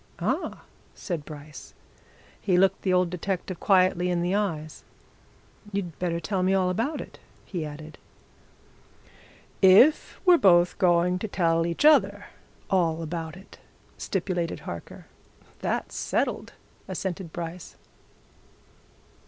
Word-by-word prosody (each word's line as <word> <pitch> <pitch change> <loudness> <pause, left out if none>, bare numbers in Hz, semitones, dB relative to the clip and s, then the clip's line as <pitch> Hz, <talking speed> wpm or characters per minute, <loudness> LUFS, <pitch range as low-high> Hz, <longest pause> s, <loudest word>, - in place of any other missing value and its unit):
"Ah!" - - -2 0.3
said 170 -7 -5
Bryce. 150 -1 -11 0.7
He 185 -3 +2
looked 190 +1 +3
the 190 - 0
old 180 -1 +2
detective 180 0 -4
quietly 185 -2 +3
in 175 -1 0
the 180 +2 0
eyes. 165 -7 -2 0.9
"You'd 190 -5 -4
better 170 -2 -1
tell 185 +3 -2
me 190 +1 +2
all 185 -1 +2
about 255 - -2
it," - - -12 0.3
he 175 -5 -4
added. 155 +1 -9 1.6
"If 200 +11 +5
we're 355 -2 +6
both 175 -2 +4
going 180 -1 +3
to 220 - -3
tell 165 -4 +1
each 170 - -1
other 305 0 +4 0.4
all 165 -4 +1
about 165 +1 -5
it," 190 - -16 0.4
stipulated 180 -3 -2
Harker. 85 -1 -8 0.5
"That's - - -2
settled," - - -2 0.3
assented 185 -2 -4
Bryce. 170 +1 -7
180 Hz, 120 wpm, -26 LUFS, 165-190 Hz, 1.6 s, we're